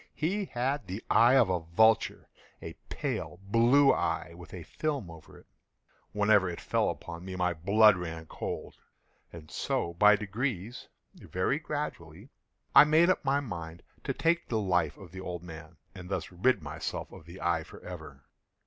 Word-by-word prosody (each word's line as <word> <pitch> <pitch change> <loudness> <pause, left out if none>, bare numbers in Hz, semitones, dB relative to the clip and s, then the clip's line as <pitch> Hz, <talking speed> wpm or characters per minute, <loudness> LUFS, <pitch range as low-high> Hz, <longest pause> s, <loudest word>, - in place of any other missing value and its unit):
He 195 +6 -1
had 130 - -2
the 95 +4 -6
eye 120 +3 +6
of 120 -8 +4
a 90 - +1
vulture—a 110 +7 0 0.2
pale 90 - -4
blue 120 +7 +4
eye, 85 +1 -2
with 85 -3 -13
a 90 -3 -8
film 140 - -3
over 80 -1 -14
it. - - -18 0.7
Whenever 105 -2 +3
it 85 - -6
fell - - 0
upon 85 0 -7
me, 95 0 -6
my 90 -1 0
blood 100 +6 +5
ran 80 -2 -6
cold; - - -6 0.5
and 80 -2 -12
so 85 - -2
by 105 +4 +6
degrees—very 105 +1 -4
gradually—I 135 - 0
made 160 +4 +4
up - - -1
my 140 +1 +1
mind 85 -9 -7 0.2
to - - -2
take 170 +1 +1
the 115 - -1
life 90 -6 0
of 90 -4 -13
the 95 0 -8
old 90 -2 -6
man, 80 -1 -11 0.2
and 90 -1 -10
thus 95 - -3
rid 95 +1 +1
myself 75 0 -5
of 80 - -13
the 90 +3 -11
eye 85 -1 0
forever. 80 -6 -11
95 Hz, 160 wpm, -29 LUFS, 85-120 Hz, 0.7 s, eye